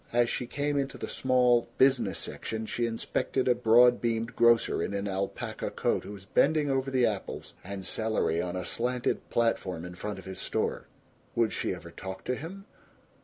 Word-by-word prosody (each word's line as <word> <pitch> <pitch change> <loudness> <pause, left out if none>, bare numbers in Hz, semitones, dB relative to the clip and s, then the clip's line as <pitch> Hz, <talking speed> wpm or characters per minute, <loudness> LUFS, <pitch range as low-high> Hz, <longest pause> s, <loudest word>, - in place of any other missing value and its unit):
As 120 0 +3
she 125 - -2
came 145 +2 -1
into 135 0 -3
the - - -5
small 125 -2 +3
business 125 -7 +3
section 110 0 -4
she 120 +2 -1
inspected 115 +3 -1
a 125 - +6
broad 120 +1 +5
beamed 115 -1 -1
grocer 120 0 +4
in 100 - -2
an 100 +1 -2
alpaca 95 0 -3
coat - - -1
who - - -7
was 100 -1 -11
bending 145 +6 +3
over 135 0 0
the 130 -2 +3
apples 105 -4 -3
and 95 0 -6
celery 110 -7 0
on 90 0 -3
a 90 - -3
slanted 125 +1 -1
platform 95 -7 0
in 90 - -7
front 105 +3 -5
of 95 - -10
his 95 0 -7
store. - - -2 0.5
Would 115 -2 +2
she - - -1
ever - - -11
talk 95 +1 -7
to 125 - -1
him? 185 +8 -8
115 Hz, 185 wpm, -29 LUFS, 100-125 Hz, 0.5 s, a